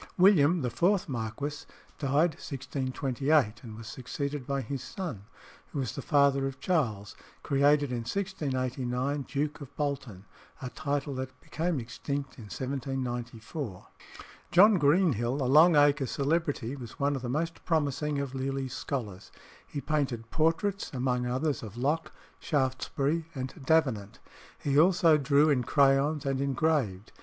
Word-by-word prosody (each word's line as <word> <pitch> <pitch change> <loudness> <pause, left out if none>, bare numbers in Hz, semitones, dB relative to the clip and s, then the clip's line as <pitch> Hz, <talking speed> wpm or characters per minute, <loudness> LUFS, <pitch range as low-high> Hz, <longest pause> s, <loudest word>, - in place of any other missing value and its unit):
William, 180 -3 +5
the 125 - -1
fourth 190 - +2
marquis, 140 +4 -4 0.4
died 150 +4 +2
1628, 135 -2 -1
and 110 -4 -9
was 115 - -9
succeeded 135 +3 -4
by 140 0 0
his 135 +1 -4
son, 130 - -6 0.4
who - - -8
was 130 -4 -2
the 140 - -5
father 140 -1 +3
of 135 -1 -7
Charles, 115 - -1 0.3
created 145 0 +3
in 125 - -1
1689 130 -4 -2
Duke 150 +2 -2
of 140 0 -10
Bolton, 135 -10 -3 0.3
a 125 -2 -6
title 145 0 -2
that 130 0 -6
became 165 -1 -2
extinct 135 +4 -5
in 110 - -9
1794. 125 - -4 0.7
John 200 +2 +7
Greenhill, 145 - +3
a 140 -2 -1
Long 155 +6 +6
Acre 145 -2 +4
celebrity, 140 -3 -1
was 120 -5 -10
one 140 0 +1
of 135 - -4
the 120 - -4
most 165 +5 -2
promising 150 -2 0
of 140 -2 -3
Lely's 135 -1 -3
scholars. 105 -10 -5 0.4
He 145 - -5
painted 125 -6 -2
portraits, 165 +5 +1
among 125 -1 0
others, 130 +3 -1
of 110 0 -9
Locke, 150 +6 0 0.3
Shaftesbury, 140 +3 0
and 130 0 -4
Davenant. 130 -11 +2 0.4
He 140 0 +2
also 170 -2 +5
drew 145 +2 +4
in 130 -3 +2
crayons, 140 +2 +3
and 135 -1 0
engraved. 135 -8 0
140 Hz, 140 wpm, -29 LUFS, 125-150 Hz, 0.7 s, John